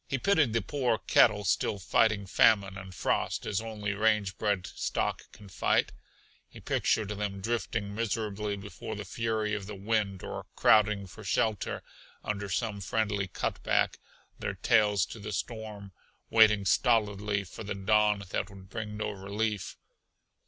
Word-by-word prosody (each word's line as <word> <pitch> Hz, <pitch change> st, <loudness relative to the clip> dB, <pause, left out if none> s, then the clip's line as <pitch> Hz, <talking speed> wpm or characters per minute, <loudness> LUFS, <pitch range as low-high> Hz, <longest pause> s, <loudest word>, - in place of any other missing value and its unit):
He 135 Hz, -, -1 dB
pitied 150 Hz, -, +3 dB
the 115 Hz, -3 st, +1 dB
poor 125 Hz, +1 st, 0 dB
cattle 105 Hz, -1 st, +4 dB
still 100 Hz, +2 st, +1 dB
fighting 100 Hz, +2 st, +2 dB
famine 100 Hz, 0 st, +4 dB
and 95 Hz, -1 st, -8 dB
frost 90 Hz, -, -1 dB
as 100 Hz, 0 st, -1 dB
only 105 Hz, -2 st, -3 dB
range 105 Hz, -2 st, +1 dB
bred 100 Hz, -4 st, 0 dB
stock -, -, -3 dB
can 105 Hz, -, -14 dB
fight. 90 Hz, -, +1 dB, 0.6 s
He -, -, -12 dB
pictured 105 Hz, -2 st, 0 dB
them 100 Hz, -1 st, -3 dB
drifting 115 Hz, -1 st, -2 dB
miserably 105 Hz, -2 st, -2 dB
before 100 Hz, +2 st, -7 dB
the 105 Hz, 0 st, -6 dB
fury 110 Hz, +1 st, -1 dB
of 100 Hz, -3 st, -3 dB
the 105 Hz, -, -6 dB
wind 100 Hz, -1 st, -1 dB
or -, -, -6 dB
crowding 105 Hz, -1 st, +4 dB
for 95 Hz, +3 st, -12 dB
shelter 105 Hz, +3 st, 0 dB, 0.4 s
under 100 Hz, -1 st, -3 dB
some 105 Hz, +1 st, -2 dB
friendly 105 Hz, -1 st, -1 dB
cutback, -, -, 0 dB, 0.4 s
their -, -, -3 dB
tails 105 Hz, -3 st, +3 dB
to 115 Hz, -, -9 dB
the 105 Hz, +1 st, -6 dB
storm, 105 Hz, -1 st, -5 dB, 0.4 s
waiting 105 Hz, -3 st, +6 dB
stolidly 105 Hz, -2 st, +2 dB
for 95 Hz, -, -9 dB
the 100 Hz, -1 st, -4 dB
dawn 105 Hz, +1 st, +2 dB
that -, -, -1 dB
would 95 Hz, -1 st, -14 dB
bring 105 Hz, -1 st, -5 dB
no 105 Hz, -, -2 dB
relief. 100 Hz, +1 st, -3 dB
105 Hz, 150 wpm, -30 LUFS, 100-110 Hz, 0.6 s, waiting